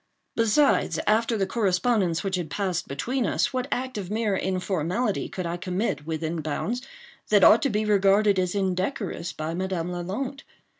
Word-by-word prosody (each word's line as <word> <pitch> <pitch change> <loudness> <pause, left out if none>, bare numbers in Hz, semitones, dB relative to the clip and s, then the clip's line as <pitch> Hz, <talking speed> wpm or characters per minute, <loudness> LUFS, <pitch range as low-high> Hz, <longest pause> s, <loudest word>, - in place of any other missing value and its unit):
Besides, 230 +6 +3
after 225 +2 +2
the 195 - +1
correspondence 190 -3 +1
which 195 -1 -1
had 175 -4 -3
passed 185 +1 -2
between 240 - -1
us, - - 0
what 255 0 -1
act 255 -3 -2
of 185 -3 -6
mere 215 -1 0
informality 185 +3 -1
could 185 - -5
I 170 +1 -2
commit, 180 - -2
within 160 0 -2
bounds, 200 +11 -2 0.5
that 205 -3 +5
ought 225 - +8
to 280 - +1
be 215 -1 0
regarded 200 0 +4
as 180 +1 -1
indecorous 190 -1 -2
by 155 +1 -4
Madame 180 -1 -2
Lalande? 205 +11 -4
195 Hz, 160 wpm, -26 LUFS, 175-225 Hz, 0.5 s, ought